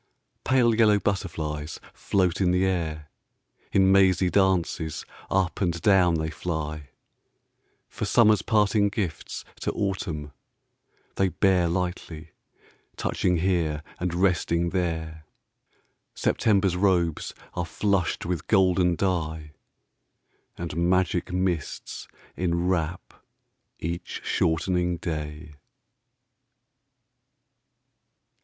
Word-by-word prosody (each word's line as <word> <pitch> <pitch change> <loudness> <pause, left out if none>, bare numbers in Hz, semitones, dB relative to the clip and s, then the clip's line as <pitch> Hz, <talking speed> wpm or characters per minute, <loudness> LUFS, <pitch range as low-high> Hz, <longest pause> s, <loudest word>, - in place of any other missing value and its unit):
Pale 125 -3 +3
yellow 110 -2 +4
butterflies 80 -6 -3
float 95 -1 0
in 90 - +3
the 90 +1 +2
air, 80 -5 -2 0.6
In 95 -1 +4
mazy 95 -2 +4
dances 90 -4 +1 0.2
up 95 -1 0
and 85 -3 0
down 90 -2 +4
they 80 0 -2
fly, 75 -4 -4 1.0
For - - -5
Summer's 110 -2 +4
parting 105 -1 +2
gifts 100 -6 -4
to - - -1
Autumn 85 -7 -3 0.9
theyBear 95 -2 +2
lightly, 85 -3 -4 0.7
touching 90 -1 0
here 80 -4 0 0.2
and 85 -1 -2
resting 85 -2 +1
there—September's 85 +3 -2
robes 90 -4 +1 0.2
are 90 - -2
flushed 100 0 0
with 85 -3 -3
golden 90 -3 +3
dye, 80 -5 -2 1.1
And 85 -3 -5
magic 90 -1 +1
mists 90 -4 -3 0.3
enwrap 85 -1 -1 0.7
each 85 +2 -5
shortening 90 +1 +1
day. 75 -2 -5
90 Hz, 85 wpm, -26 LUFS, 80-95 Hz, 1.1 s, yellow